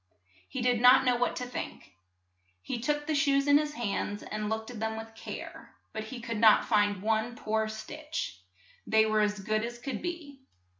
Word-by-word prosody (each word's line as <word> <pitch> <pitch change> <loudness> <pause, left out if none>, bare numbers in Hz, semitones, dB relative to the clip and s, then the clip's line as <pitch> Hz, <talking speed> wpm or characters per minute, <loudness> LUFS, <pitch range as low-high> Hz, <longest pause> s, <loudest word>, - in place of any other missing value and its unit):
He - - -3
did 245 -2 +2
not 250 +1 +7
know 250 -1 +4
what 245 0 0
to 250 - -3
think. 245 - -7 0.7
He 235 - -3
took 295 +4 -1
the 315 - -1
shoes 280 -2 +3
in 285 0 +6
his 300 0 -3
hands, 205 -2 -2
and 215 0 -4
looked 220 +2 -3
at 235 - -8
them 220 0 -2
with 225 0 -8
care, 225 - -9 0.2
but 220 0 -4
he 245 +3 -7
could 230 -2 -4
not 220 -1 +6
find 205 -3 +2
one 220 +2 0
poor 220 0 -1
stitch; 300 - -5 0.5
they 220 0 +5
were 215 0 +2
as 210 -1 +1
good 215 +2 0
as 240 +1 -5
could 265 +3 -5
be. 330 -6 -6
230 Hz, 195 wpm, -30 LUFS, 215-270 Hz, 0.7 s, not